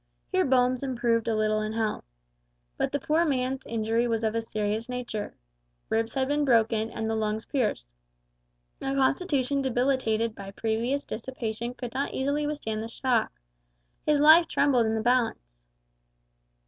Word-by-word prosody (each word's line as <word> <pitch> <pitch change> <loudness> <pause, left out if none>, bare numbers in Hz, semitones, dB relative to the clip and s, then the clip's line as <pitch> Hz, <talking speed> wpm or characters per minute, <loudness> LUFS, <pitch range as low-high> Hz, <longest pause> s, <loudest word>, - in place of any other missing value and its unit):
Here 370 -1 +2
Bones 255 -1 +2
improved 235 -4 0
a 225 - +1
little 215 0 +1
in 215 0 -3
health. 220 - -2 0.7
But - - -1
the 285 - -1
poor 315 +4 +2
man's 265 -3 -1
injury 230 +1 0
was 225 -1 -1
of 220 -1 +1
a 230 - 0
serious 215 +1 -2
nature. 245 -4 -4 0.5
Ribs 225 0 0
had 265 -1 +1
been 290 +1 +1
broken, 225 -4 +2
and 225 -1 -4
the 225 - 0
lungs 220 0 -1
pierced. 235 - -1 0.9
A 270 0 -2
constitution 275 -1 +1
debilitated 245 -3 +1
by 195 -2 -9
previous 230 +7 -1
dissipation 235 0 -5
could 245 -2 -6
not 275 +2 -2
easily 285 +2 0
withstand 225 -8 -3
the 225 - -4
shock. 235 0 0 0.7
His 300 -1 +2
life 315 +3 +7
trembled 260 -7 +2
in 220 - 0
the 220 - -1
balance. 225 - 0
235 Hz, 155 wpm, -27 LUFS, 220-270 Hz, 0.9 s, life